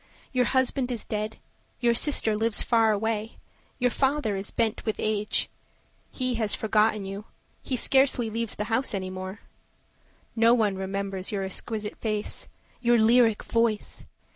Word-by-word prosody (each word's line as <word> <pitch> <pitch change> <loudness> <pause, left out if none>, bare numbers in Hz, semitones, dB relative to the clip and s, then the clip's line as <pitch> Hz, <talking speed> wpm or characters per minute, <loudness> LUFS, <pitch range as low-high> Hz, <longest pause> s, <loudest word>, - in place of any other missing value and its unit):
Your 250 -1 +3
husband 260 0 +1
is 235 - -3
dead, 215 +1 -3 0.4
your 240 -1 +3
sister 235 -4 +2
lives 225 0 +1
far 225 -2 +3
away, 220 +1 -2 0.4
Your 245 -1 +1
father 265 -6 +1
is 195 +1 -4
bent 225 -2 -1
with 220 - -1
age; 210 -1 0 0.6
He 255 -1 -1
has 210 -2 +2
forgotten 215 -1 +1
you, 195 +2 -6 0.4
he 260 - -3
scarcely 265 -1 +3
leaves 230 0 -1
the 210 - -2
house 255 -2 +1
Any 185 -1 -4
more. 185 +2 -7 0.9
No 230 +1 +5
one 210 -5 +1
remembers 195 0 -3
your 200 -2 -2
exquisite 210 +2 -4
face, 215 -2 -3 0.3
Your 240 0 +4
lyric 225 0 +4
voice! 230 -2 -1
220 Hz, 145 wpm, -26 LUFS, 210-240 Hz, 0.9 s, No